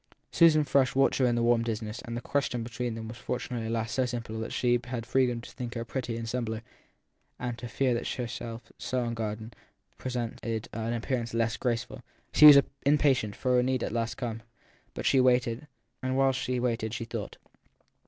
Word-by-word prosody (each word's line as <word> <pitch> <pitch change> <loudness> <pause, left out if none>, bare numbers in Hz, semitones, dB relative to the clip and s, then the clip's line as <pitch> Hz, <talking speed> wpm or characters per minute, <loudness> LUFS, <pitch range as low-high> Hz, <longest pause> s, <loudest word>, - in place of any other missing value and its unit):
Susan 155 -3 +5
Frush 130 -2 +2
watched 135 +1 +3
her 130 - +4
in 120 - +2
the 120 - +1
warm 120 0 +4
dimness, 110 -1 -3
and 120 -2 -5
the - - -4
question 125 -3 -1
between 120 0 -3
them 110 0 -6
was 115 +2 -8
fortunately 120 -2 -3
at - - -3
last 115 -1 -2
so 130 - +2
simple 120 -3 -4
that 110 - -4
she 120 -1 +2
had 120 -2 -4
freedom 125 -2 +1
to - - -11
think 125 -1 -6
her 115 0 -3
pretty 120 -1 -3
in 115 - -4
slumber 115 -1 -3 0.7
and 120 -1 -3
to 120 - -6
fear 125 +2 +1
that 120 - -2
she 125 - -2
herself, 115 0 -7
so 130 -1 -1
unguarded, 110 -1 -4 0.4
presented 115 -3 -3
an 115 +1 -2
appear 120 +2 -1
ance 115 0 -5
less 115 -1 +1
graceful. 120 -3 -2 0.3
She 150 - +9
was 145 -2 +11 0.2
impatient, 140 -7 +3
for 125 -1 +1
her - - +5
need 130 -1 0
had - - -1
at - - -8
last 115 0 -1
come, 115 -3 -4 0.5
but - - -5
she 135 - +4
waited, 125 +2 +2 0.3
and 130 0 -1
while 135 0 +4
she 125 -1 -2
waited 115 -2 -1
she 115 - -4
thought. 115 -3 -6
120 Hz, 205 wpm, -29 LUFS, 115-130 Hz, 0.7 s, was